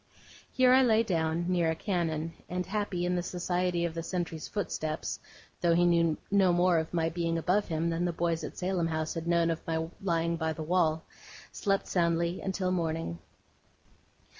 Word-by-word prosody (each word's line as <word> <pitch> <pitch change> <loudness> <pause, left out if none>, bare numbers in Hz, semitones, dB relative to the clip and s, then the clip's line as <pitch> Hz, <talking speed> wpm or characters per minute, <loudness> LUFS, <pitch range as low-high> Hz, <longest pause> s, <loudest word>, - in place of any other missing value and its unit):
Here 255 -1 +5
I 260 - +7
lay 225 -3 +4
down, 165 -4 0
near 175 -3 +2
a 160 - 0
cannon; 165 -4 -2 0.2
and, 180 0 -2
happy 195 -3 -2
in 180 0 +1
the 175 - 0
society 180 0 -1
of 170 - -3
the 165 - -3
sentry's 165 -2 -3
footsteps, 160 -6 -3 0.4
though 170 -1 +4
he 175 +1 +4
knew 170 -2 +3
no 195 -3 +5
more 175 -1 +4
of 160 - -4
my 165 -2 +1
being 165 0 -1
above 185 +5 +1
him 165 0 -1
than 165 +2 0
the 175 - +1
boys 165 -1 -1
at - - -7
Salem 180 -2 0
House 160 -1 -2
had 165 0 -5
known 170 -1 +3
of 165 - -3
my 160 0 -1
lying 170 -3 0
by 160 -1 -1
the 155 - -6
wall, 160 -1 +1 0.5
slept 195 -2 0
soundly 170 0 0
until 190 -1 -1
morning. 165 - -2
170 Hz, 185 wpm, -30 LUFS, 165-180 Hz, 0.5 s, I